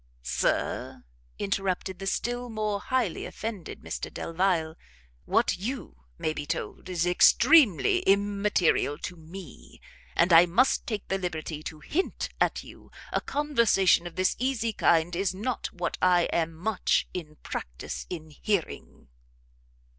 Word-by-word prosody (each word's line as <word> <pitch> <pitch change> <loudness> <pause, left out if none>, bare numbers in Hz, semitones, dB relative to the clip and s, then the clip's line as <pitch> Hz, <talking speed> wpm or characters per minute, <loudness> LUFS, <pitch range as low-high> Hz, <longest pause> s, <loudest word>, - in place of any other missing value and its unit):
"Sir," - - -1 0.3
interrupted 195 -2 -2
the 195 - -5
still 245 +5 -2
more 215 -2 -1
highly 260 +4 -1
offended 215 -6 -6
Mr - - -5
Delvile, 165 -2 0 0.5
"what - - +2
you 205 - -6
may 155 - -1
be 145 -1 -6
told - - -4
is 175 -1 0
extremely 205 - +5
immaterial 200 -6 +2
to 180 - -6
me; 165 - -12 0.4
and 170 +1 +4
I 170 +2 +8
must 235 +10 +2
take 215 -4 -3
the 195 - -1
liberty 160 -4 -4
to 155 -1 -8
hint 355 - -2
to - - 0
you, - - -14 0.2
a - - +1
conversation 235 - +2
of 175 - -10
this 185 0 +1
easy 235 -3 0
kind 170 -2 +2
is 190 +1 0
not 225 +5 -3
what 180 - -4
I 180 -1 +5
am 165 -1 0
much 195 +4 0
in 155 -4 -6
practice - - -6
in 160 -3 -7
hearing." 185 - -3
185 Hz, 135 wpm, -27 LUFS, 165-215 Hz, 0.5 s, I